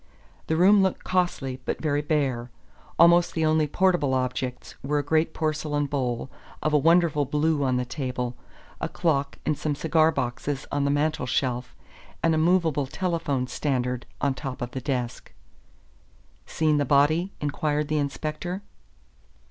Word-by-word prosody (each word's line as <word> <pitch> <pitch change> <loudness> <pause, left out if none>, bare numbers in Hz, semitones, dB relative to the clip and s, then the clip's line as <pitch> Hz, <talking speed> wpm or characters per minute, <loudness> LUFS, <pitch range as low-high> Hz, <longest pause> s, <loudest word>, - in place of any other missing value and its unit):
The 160 - +1
room 195 +4 +6
looked 190 -1 0
costly 145 -8 -1
but - - -3
very 145 -2 0
bare. 135 -6 -1 0.5
Almost 170 +1 +5
the 160 -1 +1
only 155 -1 +3
portable 175 -5 +2
objects 125 0 -3
were 145 +2 -1
a 145 - 0
great 155 +3 +1
porcelain 155 -2 -1
bowl 130 -3 -2 0.3
of 155 - +1
a - - +6
wonderful 165 -1 +4
blue 150 +1 +1
on 130 -2 +1
the 125 - -1
table, 125 -2 -3 0.4
a - - -2
clock 140 -4 0
and 155 - +1
some 150 0 -2
cigar 160 +1 +3
boxes 135 0 -3
on 145 -1 0
the - - +2
mantel 145 -2 0
shelf, 125 0 -1 0.5
and 165 - +3
a 160 - +2
movable 160 -4 +2
telephone 165 -6 -1
standard 125 -1 -2
on 140 - +1
the - - -10
top 135 -4 -4
of 120 - -5
the 130 - -5
desk. 125 -4 -3 1.1
"Seen 155 -2 +1
the 145 - +2
body?" 155 +7 +3
inquired 150 0 -1
the 155 0 0
inspector. 155 +6 -3
145 Hz, 155 wpm, -25 LUFS, 130-160 Hz, 1.1 s, room